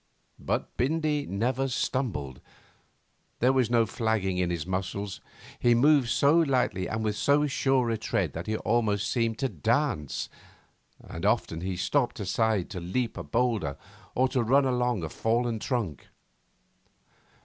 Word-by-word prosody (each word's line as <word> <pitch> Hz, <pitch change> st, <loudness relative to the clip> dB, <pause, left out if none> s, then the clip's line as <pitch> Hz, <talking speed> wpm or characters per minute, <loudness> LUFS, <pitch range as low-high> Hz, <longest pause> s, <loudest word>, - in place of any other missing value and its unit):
But -, -, -3 dB
Bindy 150 Hz, +2 st, 0 dB
never 125 Hz, +7 st, 0 dB
stumbled. 120 Hz, -, -2 dB, 1.0 s
There 130 Hz, +2 st, +3 dB
was 130 Hz, -4 st, +2 dB
no 120 Hz, -1 st, +4 dB
flagging 110 Hz, -5 st, -1 dB
in 90 Hz, -1 st, +1 dB
his 85 Hz, -2 st, -2 dB
muscles. 95 Hz, +1 st, -3 dB, 0.4 s
He 120 Hz, -1 st, +4 dB
moved 140 Hz, 0 st, +4 dB
so 145 Hz, +6 st, +4 dB
lightly 130 Hz, -, +1 dB
and 110 Hz, 0 st, -3 dB
with 105 Hz, -1 st, 0 dB
so 145 Hz, +6 st, +3 dB
sure 135 Hz, -3 st, +1 dB
a 110 Hz, -, -1 dB
tread 95 Hz, -8 st, -1 dB
that 85 Hz, +4 st, -6 dB
he 110 Hz, 0 st, 0 dB
almost 105 Hz, -4 st, +1 dB
seemed 115 Hz, -2 st, 0 dB
to 135 Hz, -, 0 dB
dance, 110 Hz, -, -1 dB, 0.7 s
and 85 Hz, -, -9 dB
often 100 Hz, -6 st, +1 dB
he 95 Hz, 0 st, -3 dB
stopped 120 Hz, +7 st, 0 dB
aside 105 Hz, -1 st, 0 dB
to 95 Hz, -, -4 dB
leap 110 Hz, +8 st, -2 dB
a -, -, -5 dB
boulder 115 Hz, -, 0 dB, 0.4 s
or 130 Hz, +1 st, +3 dB
to 125 Hz, -, +1 dB
run 135 Hz, +5 st, +3 dB
along 125 Hz, -6 st, 0 dB
a 80 Hz, -, -3 dB
fallen 115 Hz, +4 st, 0 dB
trunk. 105 Hz, -, -3 dB
115 Hz, 150 wpm, -28 LUFS, 95-130 Hz, 1.0 s, no